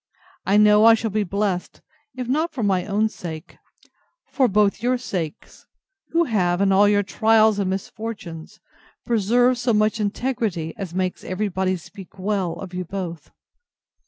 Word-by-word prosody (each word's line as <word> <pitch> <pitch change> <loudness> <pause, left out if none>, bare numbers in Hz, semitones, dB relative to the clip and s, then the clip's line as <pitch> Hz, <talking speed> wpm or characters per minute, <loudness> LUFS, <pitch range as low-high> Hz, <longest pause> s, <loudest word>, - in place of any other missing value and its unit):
I 200 +2 +4
know 210 +1 +6
I 230 0 +8
shall 225 -1 -3
be 210 +1 0
blessed, 195 -1 -2 0.4
if 250 -2 -5
not 310 +6 0
for 250 -6 -3
my 190 -2 +1
own 210 +2 +1
sake, 165 -6 -9 0.7
for 265 -3 +3
both 205 -1 +2
your 250 +2 +1
sakes, 180 -10 -6 0.4
who 335 +1 +2
have, 185 - 0
in 195 0 +3
all 200 +2 +5
your 205 0 +3
trials 220 0 +3
and 195 -2 0
misfortunes, 190 -4 -6 0.5
preserved 240 +3 +2
so 240 -1 +1
much 215 +1 +1
integrity 210 -6 -2
as 180 -3 -7
makes 185 -1 -2
every 200 +3 -2
body 185 0 -1
speak 195 +3 -13
well 190 -3 -1
of 190 -2 -9
you 180 0 -3
both. 170 -3 -6
205 Hz, 160 wpm, -22 LUFS, 185-225 Hz, 0.7 s, I